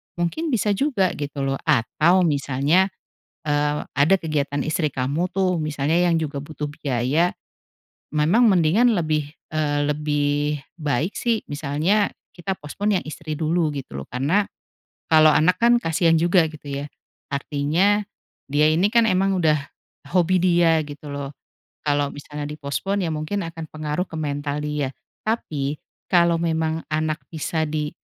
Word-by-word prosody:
mungkin 175 - -1
bisa 225 -7 +1
juga 205 -4 +1
gitu 145 -1 -4
loh. 135 0 -1
Atau 155 +7 +3
misalnya, 145 +3 +2 0.6
eee, 150 0 0
ada 145 +7 +5
kegiatan 145 -4 -1
istri 155 0 0
kamu 140 +7 -1
tuh, 185 -2 +1
misalnya 150 +1 0
yang 170 - +3
juga 145 -2 -3
butuh 150 +1 -5
biaya, 145 +4 0 0.8
memang 170 +11 +4
mendingan 195 +5 +4
lebih, 155 -5 0 0.2
eee, 150 -2 0
lebih 145 0 0 0.2
baik 150 +3 -1
sih, 230 -2 0
misalnya 150 +8 +1 0.2
kita 185 +2 -3
postpone 195 +6 -1
yang - - -13
istri 155 0 -6
dulu 160 +1 +1
gitu 135 - -6
loh. 70 - -9
Karena 145 - +1 0.7
kalau 155 -1 +7
anak 170 +5 +3
kan 240 +1 +5
kasihan 165 -2 +2
juga 175 0 +4
gitu 155 -2 -13 0.2
ya. - - -5 0.5
Artinya 155 +9 +1 0.4
dia 150 +2 +3
ini 165 +5 +3
kan, 235 -1 +5
emang 195 +1 +2
udah 155 -1 +4 0.6
hobi 185 0 +3
dia 170 -2 +4
gitu 145 0 -9
loh. 140 0 -5 0.5
Kalau 145 -1 +1
misalnya 145 0 -7
di-postpone 155 +7 -2
ya 165 - -1
mungkin 160 +6 -3
akan 165 -1 -7
pengaruh 155 +2 -2
ke 160 - -6
mental 145 -1 -2
dia. 150 -2 -1 0.3
Tapi 150 -10 -2 0.3
kalau 170 -2 +4
memang 160 -1 0
anak 155 0 -1
bisa 160 0 -2
di, 150 -1 -2
155 Hz, 145 wpm, -23 LUFS, 145-175 Hz, 0.8 s, kalau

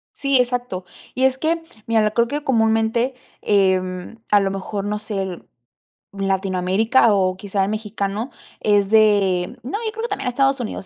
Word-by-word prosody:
Sí, 275 -2 +2
exacto. 245 -7 -1 0.3
Y 260 - 0
es 265 0 +3
que 330 +3 0 0.3
mira, 220 -2 +2
creo 235 +1 +2
que 290 +4 -3
comúnmente, 225 0 +1 0.3
em, 185 0 +1
a 205 - +6
lo 195 -1 0
mejor, 195 +1 -4
no 210 0 -2
sé, 210 -3 -3 0.9
Latinoamérica 195 +4 +2
o 185 -2 +1
quizá 195 0 -1
el 195 - -1
mexicano 210 +2 -3 0.3
es 205 -2 +2
de 205 -5 +3
no, 270 - -3
yo 440 - -1
creo 450 +1 -3
también 270 - -3
a - - +3
Estados 270 +2 +2
Unidos, 220 -5 -5
215 Hz, 160 wpm, -21 LUFS, 195-245 Hz, 0.9 s, a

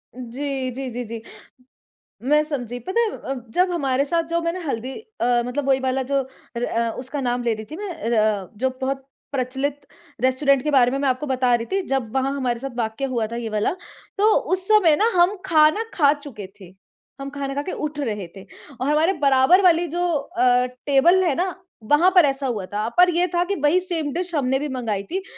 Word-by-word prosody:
जी, 255 +1 -4
जी, 265 +1 -5
जी, 245 +1 -4
जी। 225 0 -7 1.1
मैं 300 0 +5
समझी 245 -5 -4
पता 425 +5 +1
है 450 -2 -1
अ, 270 - -5 0.2
जब 360 +7 +2
हमारे 275 -4 0
साथ 335 +2 0
जो 335 0 0
मैंने 335 +2 -2
हल्दी 260 -4 -3 0.3
अ, - - +2 0.2
मतलब 275 +2 -3
वही 265 0 +4
वाला 260 0 0
जो 275 -1 +3 0.4
अ, 235 -1 0
उसका 270 +2 -4
नाम 245 -1 -1
ले 235 - +1
रही 220 - -8
थी - - -5
मैं 410 0 -5 0.3
अ, 210 -3 +1
जो 260 +3 +1
बहुत 270 0 -2 0.3
प्रचलित 275 +2 -3 0.3
रेस्टोरेंट 260 +1 +2
के 300 - 0
बारे 250 -3 +4
में 275 - -1
मैं 280 - 0
आपको 255 +4 -2
बता 255 -2 +2
रही 230 - -3
थी 390 0 +1
जब 265 -5 -1
वहाँ 270 +1 +1
हमारे 245 -4 -1
साथ 270 +1 -5
वाक़या 230 +3 -2
हुआ 235 -4 -1
था - - -4
ये 230 -2 -4
वाला, 215 +8 0 0.4
तो 425 +2 +4 0.2
उस 375 0 0
समय 370 -8 +6
न 450 - +4
हम 355 +3 +4
खाना 315 +4 +4
खा 285 -4 +4
चुके 275 -10 -9
थे, 185 -1 -13 0.5
हम 275 - -5
ख़ाना 275 -1 -4
खा 285 - 0
के 365 - -5
उठ 300 -1 -4
रहे 210 -8 -3
थे। 190 - -11 0.4
और 265 - 0
हमारे 315 +5 +3
बराबर 275 +7 +5
वाली 345 -1 +4
जो 350 +2 -1
अ, 265 -5 +2 0.2
टेबल 335 +7 +4
है 315 -7 +1
ना 365 0 -1 0.4
वहाँ 340 +6 +5
पर 355 -4 +8
ऐसा 275 -1 -1
हुआ 215 -6 -3
था, 210 +3 -3
पर 360 0 +7
ये 355 +1 +3
था 350 - +3
कि 400 +2 -1
वही 305 +5 +4
सेम 325 -6 -3
डिश 350 0 -3
हमने 265 -1 +1
भी 295 - -3
मँगाई 225 -6 -2
थी। 380 +1 -2
275 Hz, 215 wpm, -22 LUFS, 250-335 Hz, 1.1 s, पर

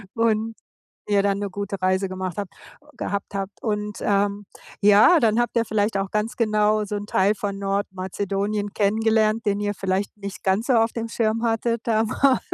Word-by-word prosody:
und 225 -1 +1 0.5
ihr 200 -1 +4
dann 200 -1 +1
'ne 200 -1 -3
gute 200 0 -4
Reise 185 +1 +1
gemacht 185 -1 -5
habt 200 -2 -5 0.4
gehabt 200 0 -4
habt 195 +1 -5
und, 210 -2 -3
ähm, 200 0 0 0.4
ja, 210 - +7
dann 225 -1 +2
habt 240 0 -1
ihr 230 - +3
vielleicht 210 -1 0
auch 195 0 -2
ganz 215 +3 -1
genau 215 -1 +2
so 210 - -4
'n 205 0 -4
Teil 200 +1 +2
von 200 -1 -4
Nordmazedonien 200 +1 -2
kennengelernt, 220 +1 +2
den 205 -1 +1
ihr 205 0 -1
vielleicht 195 +2 -2
nicht 200 -1 -8
ganz 195 +6 +1
so 260 - +3
auf 225 -1 +3
dem 230 -1 -3
Schirm 225 0 0
hattet 230 0 0
da 220 -1 +2
mal, 265 +4 +2
205 Hz, 180 wpm, -23 LUFS, 200-220 Hz, 0.5 s, ja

